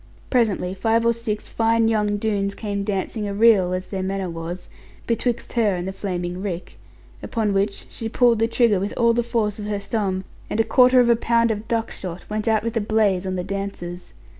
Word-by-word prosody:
Presently 210 Hz, -7 st, +1 dB
five 225 Hz, +4 st, +1 dB
or 235 Hz, -, +4 dB
six 225 Hz, -2 st, -4 dB
fine 225 Hz, 0 st, +2 dB
young 210 Hz, -2 st, +1 dB
Doones 200 Hz, -2 st, -1 dB
came 200 Hz, -2 st, -3 dB
dancing 205 Hz, +1 st, -2 dB
a 200 Hz, -, -3 dB
reel 205 Hz, -4 st, +5 dB
(as 185 Hz, 0 st, -4 dB
their 190 Hz, -2 st, -2 dB
manner 190 Hz, -1 st, -2 dB
was) 165 Hz, +2 st, -6 dB, 0.4 s
betwixt 235 Hz, +1 st, -1 dB
her 220 Hz, -5 st, +2 dB
and 175 Hz, +1 st, -4 dB
the -, -, -2 dB
flaming 180 Hz, -2 st, -4 dB
rick. 185 Hz, -3 st, -5 dB, 0.4 s
Upon 220 Hz, -3 st, -1 dB
which 200 Hz, +1 st, -1 dB
she 225 Hz, -, -6 dB
pulled 235 Hz, -1 st, +3 dB
the 225 Hz, -, +3 dB
trigger 230 Hz, -4 st, +3 dB
with 200 Hz, +2 st, -3 dB
all 235 Hz, -1 st, +4 dB
the 240 Hz, -, +2 dB
force 225 Hz, -3 st, -1 dB
of 210 Hz, -, -5 dB
her 210 Hz, -1 st, -1 dB
thumb, 200 Hz, -2 st, -2 dB, 0.3 s
and 210 Hz, -, -2 dB
a -, -, +5 dB
quarter 250 Hz, +3 st, +5 dB
of 240 Hz, -, +3 dB
a 235 Hz, -, +6 dB
pound 230 Hz, 0 st, +2 dB
of 215 Hz, 0 st, -4 dB
duck 230 Hz, -1 st, -1 dB
shot 180 Hz, -1 st, -7 dB
went 215 Hz, +1 st, -2 dB
out 220 Hz, -1 st, +2 dB
with 230 Hz, 0 st, -3 dB
a 225 Hz, -, +1 dB
blaze 205 Hz, -3 st, +1 dB
on 185 Hz, -, -2 dB
the 180 Hz, -, -2 dB
dancers. 190 Hz, -2 st, -6 dB
210 Hz, 215 wpm, -22 LUFS, 190-230 Hz, 0.4 s, a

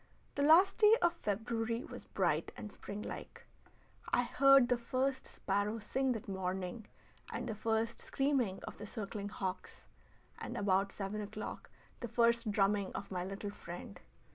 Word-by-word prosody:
The 285 Hz, -, -1 dB
last 325 Hz, +7 st, +6 dB
day 430 Hz, 0 st, +8 dB
of 345 Hz, 0 st, +3 dB
February 230 Hz, -, -2 dB
was -, -, -9 dB
bright -, -, 0 dB
and 210 Hz, -, -7 dB
springlike. 205 Hz, +1 st, -7 dB, 0.7 s
I 245 Hz, -, +4 dB
heard 275 Hz, 0 st, +6 dB
the 245 Hz, -1 st, +2 dB
first 260 Hz, +2 st, -1 dB
sparrow 205 Hz, +3 st, -1 dB
sing 260 Hz, +4 st, 0 dB
that 225 Hz, -, -6 dB
morning 190 Hz, +2 st, -3 dB, 0.4 s
and -, -, -3 dB
the 225 Hz, -, -2 dB
first 225 Hz, +2 st, -1 dB
screaming 265 Hz, -9 st, 0 dB
of -, -, -7 dB
the 210 Hz, -, -7 dB
circling 205 Hz, -2 st, -5 dB
hawks, 190 Hz, -2 st, -5 dB, 0.6 s
and -, -, -5 dB
about 195 Hz, 0 st, +2 dB
seven 205 Hz, +1 st, -4 dB
o'clock 210 Hz, +1 st, -6 dB, 0.3 s
the 240 Hz, -, -4 dB
first 235 Hz, 0 st, +3 dB
drumming 200 Hz, -1 st, +2 dB
of 200 Hz, -, -6 dB
my 180 Hz, -1 st, -1 dB
little 195 Hz, +2 st, -5 dB
friend. 170 Hz, -, -8 dB
215 Hz, 150 wpm, -35 LUFS, 200-245 Hz, 0.7 s, day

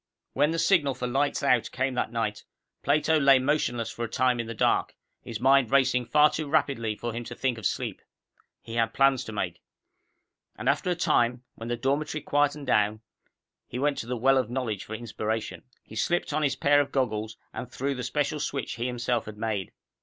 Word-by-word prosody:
When 145 Hz, +2 st, +3 dB
the 165 Hz, -, -1 dB
signal 155 Hz, -6 st, +3 dB
for 125 Hz, -, -4 dB
lights 140 Hz, +4 st, 0 dB
out 125 Hz, -4 st, +3 dB
came 130 Hz, +1 st, -1 dB
that 125 Hz, -, -1 dB
night, 110 Hz, -3 st, -2 dB, 0.4 s
Plato 155 Hz, +2 st, +2 dB
lay 140 Hz, -2 st, +6 dB
motionless 130 Hz, -4 st, 0 dB
for 120 Hz, -, -5 dB
a 115 Hz, -, -3 dB
time 125 Hz, +1 st, +1 dB
in 115 Hz, -, -3 dB
the 115 Hz, -, -6 dB
dark, -, -, +1 dB, 0.3 s
his 115 Hz, -3 st, -6 dB
mind 135 Hz, -1 st, +4 dB
racing 130 Hz, -2 st, +3 dB
far 150 Hz, 0 st, +5 dB
too 155 Hz, -2 st, -4 dB
rapidly 130 Hz, -8 st, +1 dB
for 120 Hz, +2 st, -4 dB
him 120 Hz, +1 st, -4 dB
to -, -, -7 dB
think 125 Hz, -3 st, -1 dB
of 105 Hz, -, +1 dB
sleep. -, -, -4 dB, 0.6 s
He 115 Hz, -, -9 dB
had 115 Hz, -1 st, 0 dB
plans 135 Hz, -2 st, +4 dB
to -, -, -7 dB
make. 105 Hz, -, -3 dB, 0.9 s
And 125 Hz, -, -6 dB
after 145 Hz, +6 st, +2 dB
a 180 Hz, -, +1 dB
time, 120 Hz, -6 st, +1 dB
when 115 Hz, -, -8 dB
the 120 Hz, -, -1 dB
dormitory 145 Hz, +4 st, -1 dB
quieted 145 Hz, 0 st, +1 dB
down, 105 Hz, -3 st, +2 dB, 0.7 s
he 120 Hz, -, -6 dB
went 145 Hz, +2 st, 0 dB
to 115 Hz, -, -5 dB
the 125 Hz, 0 st, -2 dB
well 135 Hz, +3 st, +4 dB
of 125 Hz, -4 st, -2 dB
knowledge 120 Hz, -6 st, -3 dB
for 110 Hz, -, -6 dB
inspiration. 110 Hz, -1 st, -4 dB, 0.2 s
He 110 Hz, -, -13 dB
slipped 175 Hz, +6 st, 0 dB
on 155 Hz, -, +1 dB
his 140 Hz, -4 st, +1 dB
pair 145 Hz, +1 st, +4 dB
of 145 Hz, -, -4 dB
goggles 110 Hz, -4 st, -1 dB, 0.2 s
and 125 Hz, -1 st, -6 dB
threw 140 Hz, +2 st, -2 dB
the 125 Hz, -, -5 dB
special 145 Hz, +4 st, -1 dB
switch 135 Hz, -4 st, -3 dB
he 120 Hz, +1 st, -1 dB
himself 120 Hz, -1 st, -1 dB
had 105 Hz, -1 st, -9 dB
made. 105 Hz, -4 st, -2 dB
125 Hz, 205 wpm, -27 LUFS, 115-140 Hz, 0.9 s, lay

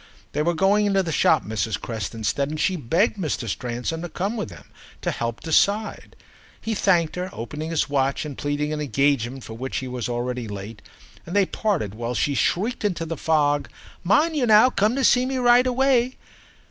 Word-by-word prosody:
They -, -, -1 dB
were 170 Hz, +2 st, +1 dB
going 200 Hz, +4 st, +3 dB
into 195 Hz, -1 st, +2 dB
the 165 Hz, -, -3 dB
shop, 145 Hz, -, +3 dB
Mrs. 110 Hz, 0 st, -2 dB
Creston 110 Hz, -1 st, -5 dB
said, 140 Hz, +6 st, 0 dB
and 155 Hz, 0 st, -4 dB
she 185 Hz, -, +1 dB
begged 170 Hz, -, +1 dB
Mr. 155 Hz, -9 st, -2 dB
Stransom 125 Hz, +9 st, -3 dB
to 175 Hz, -, -5 dB
come 195 Hz, +7 st, -2 dB
with 215 Hz, -, -3 dB
them 90 Hz, -, -14 dB, 0.3 s
and -, -, 0 dB
help 115 Hz, -2 st, -4 dB
to -, -, -7 dB
decide. 205 Hz, +7 st, +1 dB, 0.4 s
He 225 Hz, -, -3 dB
thanked 175 Hz, -6 st, +2 dB
her, 180 Hz, +1 st, -3 dB
opening 150 Hz, +8 st, -6 dB
his 165 Hz, -2 st, 0 dB
watch 140 Hz, 0 st, 0 dB
and 145 Hz, -2 st, -6 dB
pleading 145 Hz, +2 st, -2 dB
an 150 Hz, -, -3 dB
engagement 135 Hz, -2 st, 0 dB
for 110 Hz, -, -8 dB
which 130 Hz, +4 st, -4 dB
he 130 Hz, -, -3 dB
was 125 Hz, -1 st, -4 dB
already 120 Hz, 0 st, -3 dB
late, 100 Hz, +1 st, -8 dB, 0.5 s
and 175 Hz, -, -5 dB
they 200 Hz, -1 st, +4 dB
parted 180 Hz, -, -1 dB
while 120 Hz, +2 st, -4 dB
she 145 Hz, -, +1 dB
shrieked 210 Hz, -, 0 dB
into 180 Hz, -5 st, -1 dB
the 165 Hz, +1 st, -4 dB
fog, 145 Hz, -3 st, +1 dB, 0.3 s
"Mind 295 Hz, -, +3 dB
now 215 Hz, +1 st, +7 dB
you 255 Hz, -, +2 dB
come 210 Hz, +3 st, +1 dB
to 270 Hz, -, 0 dB
see 250 Hz, 0 st, +5 dB
me 265 Hz, 0 st, -2 dB
right 245 Hz, 0 st, +5 dB
away!" 255 Hz, -1 st, +2 dB
155 Hz, 200 wpm, -23 LUFS, 125-200 Hz, 0.5 s, now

